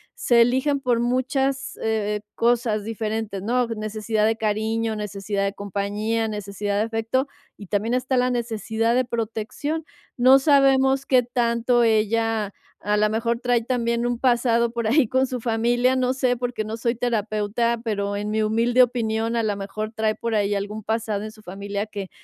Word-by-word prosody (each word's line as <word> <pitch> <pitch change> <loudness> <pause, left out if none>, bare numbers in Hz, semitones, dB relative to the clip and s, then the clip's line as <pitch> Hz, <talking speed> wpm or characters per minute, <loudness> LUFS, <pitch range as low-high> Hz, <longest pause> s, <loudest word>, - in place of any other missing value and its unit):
se 235 -1 +3
eligen 260 +4 +2
por 245 -3 +1
muchas, 265 +2 -1
eh, 210 -2 -1
cosas 230 -3 +1
diferentes, 215 -2 -3
¿no?, 245 +2 +1
necesidad 215 -1 -1
de 225 +1 +2
cariño, 220 +1 -1
necesidad 205 -1 -3
de 200 - -1
compañía, 205 +3 -2
necesidad 205 -1 -3
de 220 - +2
afecto, 225 +4 -1 0.3
y 200 - -11
también 215 +4 -1
está 255 +1 0
la 250 0 +2
necesidad 230 -1 -1
de 255 0 +2
protección. 235 +8 -3 0.3
No 260 +2 +7
sabemos 270 -1 +4
qué 255 -2 +4
tanto 240 0 +1
ella, 220 -1 +1 0.3
a 210 +1 0
la 215 0 +3
mejor 230 +2 -1
trae 245 -2 +1
también 235 -1 0
un 245 -1 -1
pasado 235 -2 +2
por 235 -2 -2
ahí 265 +1 +4
con 260 +3 +1
su 250 -1 -4
familia, 240 +2 +1
no 255 0 +1
sé, 255 -2 +1
porque 245 -2 -3
no 215 +1 -5
soy 235 +1 0
terapeuta, 225 0 -1
pero 200 -3 -2
en 210 +1 -3
mi 220 0 +1
humilde 230 +4 +3
opinión, 230 -1 -1
a 230 - +1
la 210 -2 0
mejor, 215 +2 -5
trae 220 -1 0
por 230 -1 -3
ahí 205 -1 +1
algún 210 +2 -4
pasado 220 -1 -2
en 215 - -6
su 215 - -17
familia 200 +2 -4
que 200 -3 -7
225 Hz, 175 wpm, -23 LUFS, 215-245 Hz, 0.3 s, No